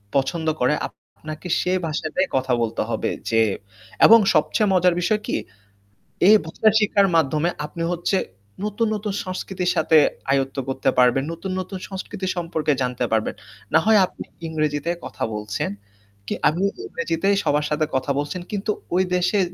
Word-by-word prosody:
পছন্দ 160 +4 0
করে 125 +4 +3
আপনাকে 155 +3 -11
সেই 185 +1 +1
ভাষাটাই 155 +4 -1
কথা 130 -1 +1
বলতে 115 -1 -1
হবে - - -1 0.2
যে 115 0 +3 0.6
এবং 230 +1 +9 0.2
সবচেয়ে 195 +6 +2
মজার 180 -1 +4
বিষয় 210 +3 +1
কি? - - -1 0.9
এই 215 - +9
ভাষা 215 +7 +2
শিক্ষার 200 -1 +3
মাধ্যমে 155 +1 +2 0.2
আপনি 165 +2 -5
হচ্ছে 175 +3 0 0.5
নতুন, 210 +2 0
নতুন 210 -1 -3
সংস্কৃতির 185 -1 -2
সাথে 160 -1 +4 0.3
আয়ত্ত 135 0 0
করতে 135 - 0
পারবেন। 125 +2 +4
নতুন, 185 +3 -6
নতুন 185 +1 -7
সংস্কৃতি 190 0 -5
সম্পর্কে 160 -3 0
জানতে 125 -1 -1
পারবেন। 110 -1 0 0.4
না - - +7
হয় 220 -1 +6
আপনি - - -9 0.2
ইংরেজিতে 155 0 -1
কথা - - -6
বলছেন 105 -1 -3 0.6
কি - - -1 0.2
আপনি 175 +6 0 0.2
ইংরেজিতেই 170 +4 0
সবার 150 +1 +1
সাথে 155 +1 +1
কথা 130 +2 0
বলছেন। 150 +5 -3
কিন্তু 210 +1 -1 0.2
ওই 185 - +4
দেশে 180 +3 +2
165 Hz, 150 wpm, -22 LUFS, 145-190 Hz, 0.9 s, এবং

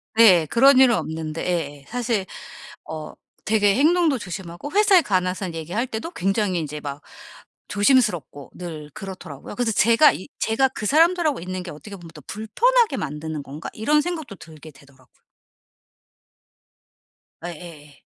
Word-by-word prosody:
네. 190 -8 +7
그런 265 - +5
일은 250 -3 +6
없는데. 160 -2 -4
예예. 145 -6 -3
사실 235 -5 -2 0.6
어 155 -1 -6 0.3
되게 205 -2 +3
행동도 310 -1 +3
조심하고 185 - -7
회사에 405 -3 +5
관해서 185 - -1
얘기할 170 +10 -3
때도 225 +9 -5
굉장히 195 - 0
인제 150 -1 -5
막 145 0 -7 0.7
조심스럽고 205 - +1
늘 160 -4 -8
그렇더라고요. 185 -6 -9
그래서 245 -2 0
제가 230 +8 +5
이 185 - -8
제가 255 +4 +2
그 215 -4 -6
사람들하고 325 - +3
있는 185 +1 -5
게 175 - -8
'어떻게 200 +7 -10
보면 170 -3 -12
더 150 - -12
불편하게 440 - +1
만드는 150 +1 -5
건가?' 145 +3 -8
이런 295 +8 +2
생각도 315 - -5
들게 160 -1 -13
되더라고요. 135 -2 -23 2.2
예예예. 155 -4 -10
190 Hz, 325 characters per minute, -22 LUFS, 160-245 Hz, 2.2 s, 네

